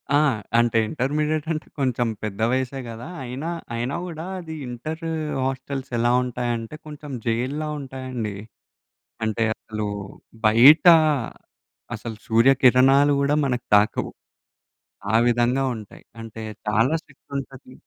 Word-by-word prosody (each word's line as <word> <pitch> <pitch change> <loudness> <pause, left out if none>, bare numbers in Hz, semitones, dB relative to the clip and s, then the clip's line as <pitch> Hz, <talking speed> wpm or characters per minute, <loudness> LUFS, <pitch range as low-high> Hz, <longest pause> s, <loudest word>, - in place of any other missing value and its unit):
ఆ! - - +6 0.4
అంటే 120 -1 +3
ఇంటర్మీడియేట్ 150 +3 -1
అంటే 155 - -5
కొంచెం 125 -3 +1 0.2
పెద్ద 105 0 -4
వయసే 130 +1 -1
గదా! 115 +6 -8 0.2
అయినా, 130 +7 -5 0.3
అయినా 120 +5 -2
గూడా 165 -2 -6
అది 160 -2 -7
ఇంటర్ 155 +7 -6 0.4
హాస్టెల్స్ 135 0 -4
ఎలా 120 +1 +2
ఉంటాయంటే 120 0 -3
కొంచెం 150 -1 -9
జైల్లా 130 +7 -1
ఉంటాయండి. 130 -6 -5 0.9
అంటే 110 +1 0
అసలు 110 -1 -5 0.6
బయట 125 +10 +7 1.1
అసలు 110 0 -7
సూర్యకిరణాలు 135 +4 +5
గూడా 140 +1 +2
మనకు 125 -2 -2
తాకవు. 105 +1 +1 1.0
ఆ - - +4
విధంగా 120 +2 +2
ఉంటాయి. 105 -3 -11 0.2
అంటే 115 0 -8 0.3
చాలా 110 +8 +2
స్ట్రిక్ట్ 140 0 -25
ఉంటది. 130 -1 -8
130 Hz, 115 wpm, -23 LUFS, 115-140 Hz, 1.1 s, బయట